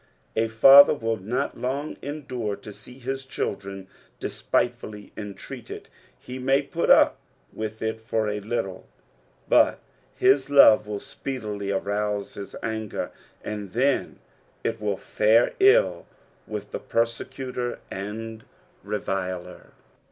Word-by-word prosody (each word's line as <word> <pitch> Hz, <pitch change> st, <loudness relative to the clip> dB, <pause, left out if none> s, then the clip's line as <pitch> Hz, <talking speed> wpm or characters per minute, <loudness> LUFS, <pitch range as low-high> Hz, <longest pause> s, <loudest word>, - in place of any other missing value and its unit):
A 115 Hz, +1 st, +2 dB
father 135 Hz, +7 st, +8 dB
will 115 Hz, -4 st, -1 dB
not 120 Hz, +9 st, -3 dB
long 135 Hz, +5 st, -2 dB
endure 130 Hz, -8 st, -4 dB
to 105 Hz, -, -11 dB
see 125 Hz, +5 st, -12 dB
hia 135 Hz, +1 st, -3 dB
children 100 Hz, -7 st, -5 dB, 0.3 s
despitefuUy 110 Hz, -4 st, -2 dB
entreated; 105 Hz, -2 st, -8 dB, 0.3 s
he 125 Hz, +1 st, -8 dB
may 135 Hz, +2 st, +2 dB
put 165 Hz, +4 st, -2 dB
up -, -, +6 dB, 0.3 s
with 110 Hz, 0 st, -5 dB
it 110 Hz, 0 st, -2 dB
for 110 Hz, -1 st, -1 dB
a 105 Hz, 0 st, -2 dB
little, 105 Hz, -3 st, -4 dB, 0.6 s
but -, -, +5 dB, 0.4 s
his 135 Hz, +1 st, +3 dB
love 125 Hz, -7 st, +7 dB
will 105 Hz, -1 st, -3 dB
speedily 105 Hz, -8 st, -5 dB
arouse 100 Hz, +1 st, -1 dB
bis 100 Hz, -, -8 dB
anger, 110 Hz, -2 st, -3 dB, 0.3 s
and 105 Hz, -3 st, -5 dB
then 135 Hz, +4 st, +1 dB, 0.5 s
it 115 Hz, -1 st, -2 dB
will 105 Hz, -2 st, -1 dB
fare 110 Hz, +5 st, +3 dB
ill 415 Hz, +6 st, +4 dB, 0.4 s
with 105 Hz, -1 st, -6 dB
the -, -, -4 dB
persecutor 120 Hz, +2 st, -2 dB
and 110 Hz, +3 st, -6 dB, 0.4 s
reviler. 95 Hz, -3 st, -4 dB
110 Hz, 120 wpm, -25 LUFS, 105-130 Hz, 0.6 s, father